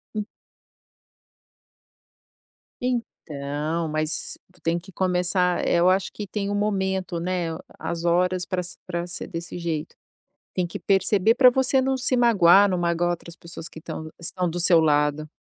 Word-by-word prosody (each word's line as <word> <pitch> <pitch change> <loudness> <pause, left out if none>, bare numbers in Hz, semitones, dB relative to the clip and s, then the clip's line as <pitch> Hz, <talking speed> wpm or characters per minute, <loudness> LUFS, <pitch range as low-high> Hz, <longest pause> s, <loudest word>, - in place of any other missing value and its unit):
Hum. 210 -1 -2 2.6
Então, 160 - -3
mas 155 +1 -1
tu 180 - -23
tem 165 +1 0
que 185 +3 -10
começar, 180 0 +1
eh, - - +2
eu 175 +2 +5
acho 190 +1 +1
que 210 - -7
tem 200 0 -3
o 205 - -1
momento, 190 -3 -1
né, 175 -1 -2
a - - -9 0.2
as 170 -1 -4
horas 180 +1 +1
pra 185 -1 -2
se 175 - -7
pra 175 -1 -4
ser 180 - -4
desse 170 +1 -6
jeito, 165 -2 -4 0.6
tem 180 -1 0
que 170 - -7
perceber 200 +2 +3
pra 255 0 +7
você 265 +1 +2
não 265 0 0
se 255 0 +2
magoar, 205 -5 +6
não 185 -2 -1
magoar 175 0 0
outras 170 0 -5
pessoas 170 0 -9
que 160 - -12
tão 160 0 -7
estão 180 +1 0
do 175 +2 -3
seu 170 -1 +6
lado. 150 0 +1
180 Hz, 165 wpm, -24 LUFS, 170-195 Hz, 2.6 s, pra